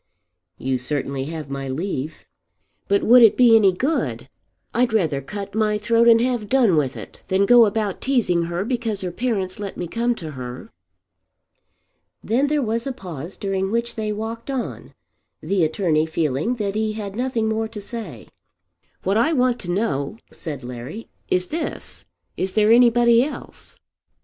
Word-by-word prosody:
"You 130 -1 -1
certainly 135 0 -2
have 155 -1 -6
my 135 -1 -4
leave." 155 0 -4 0.6
"But 200 0 +2
would 245 +2 +7
it 225 -3 +6
be 240 -3 +7
any 205 -4 +6
good? 270 - -2 0.4
I'd 240 -1 +1
rather 160 -10 +1
cut 200 +7 -7
my 215 -1 +1
throat 230 +2 +3
and 230 -1 +7
have 240 -4 -1
done 245 -9 +4
with 140 -3 0
it - - -11
than 190 +1 +2
go 235 0 +7
about 205 -2 -2
teasing 215 -11 +1
her 175 +3 -3
because 230 -4 -2
her 180 -2 -3
parents 195 -4 -2
let 200 -2 -6
me 175 - -3
come 235 +6 0
to 160 -7 -7
her." 130 - -8 1.5
Then 255 +6 +1
there 295 -1 +1
was 230 +2 -1
a - - -1
pause 175 - -8
during 195 -1 -1
which 235 +2 -1
they 215 -1 -3
walked 225 +4 -5
on, 265 -3 -5 0.4
the 195 -3 0
attorney 160 -1 +1
feeling 160 - -1
that 205 -4 -2
he 215 0 -1
had 205 -2 -6
nothing 240 -2 -1
more 220 0 -1
to 220 -1 -8
say. 200 - -7 0.8
"What 195 +3 +1
I 310 +9 +3
want 250 -3 +2
to 175 - -8
know," 175 -4 -1
said 145 -6 -7
Larry, 125 - -8 0.2
"is 180 0 +1
this. 320 0 -5 0.3
Is 185 0 -2
there 215 0 +4
anybody 235 0 +5
else?" 295 - -7
210 Hz, 165 wpm, -22 LUFS, 170-235 Hz, 1.5 s, would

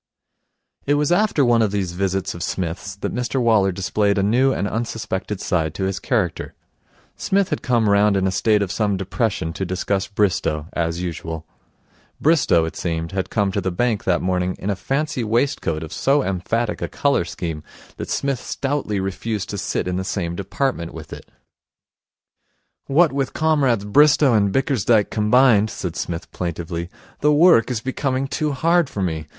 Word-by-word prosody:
It 145 - +3
was 150 +2 +1
after 175 -6 +3
one 120 -1 +4
of 110 - +2
these 95 -3 -2
visits 95 +1 -1
of 85 - -8
Psmith's 90 +2 -3
that 100 - -4
Mr 125 +2 -1
Waller 110 -5 +3
displayed 100 +2 0
a 100 - +2
new 125 +6 +3
and 100 - -1
unsuspected 105 -3 -3
side 80 -6 -1
to 95 - -3
his 95 0 -1
character. 105 - -1 0.6
Psmith 195 -1 +1
had - - -2
come 120 -4 +1
round 100 0 +4
in 95 - +1
a 95 - +1
state 105 +2 +2
of 95 - -4
some 105 -3 0
depression 95 -3 -2
to 95 - -4
discuss 95 +2 -1
Bristow, 95 -7 0
as 85 +1 -2
usual. 80 -2 -5 0.7
Bristow, 140 - +3
it 80 - -6
seemed, 80 -1 -3
had 95 -1 -2
come 100 -3 +1
to - - -1
the 95 - -1
bank 110 +3 -1
that 90 -2 +1
morning 90 0 0
in 100 - -2
a - - -1
fancy 135 - -2
waistcoat 110 - 0
of 80 - -8
so 140 +1 +2
emphatic 105 +5 -2
a - - -1
colour 140 -11 +1
scheme 85 -2 -5 0.4
that - - -6
Psmith 140 -3 -1
stoutly 135 -9 -2
refused 95 +2 -3
to 100 - -4
sit - - -2
in 90 0 -1
the 95 - -2
same 90 -3 -3
department 95 -2 -2
with 80 -2 -9
it. - - -11 1.6
'What 155 +2 +4
with 135 -1 -1
Comrades 140 -9 +2
Bristow 145 +4 +5
and 100 -3 +3
Bickersdyke 120 -4 +2
combined,' 110 0 +4
said 90 -6 -5
Psmith 85 -1 -5
plaintively, 85 0 -4 0.3
'the 150 - +3
work 155 -5 +5
is 120 -4 -2
becoming 130 +1 -1
too 150 +2 -1
hard 165 +2 +2
for 100 -7 -3
me. 80 -3 -3
100 Hz, 175 wpm, -21 LUFS, 90-130 Hz, 1.6 s, Bristow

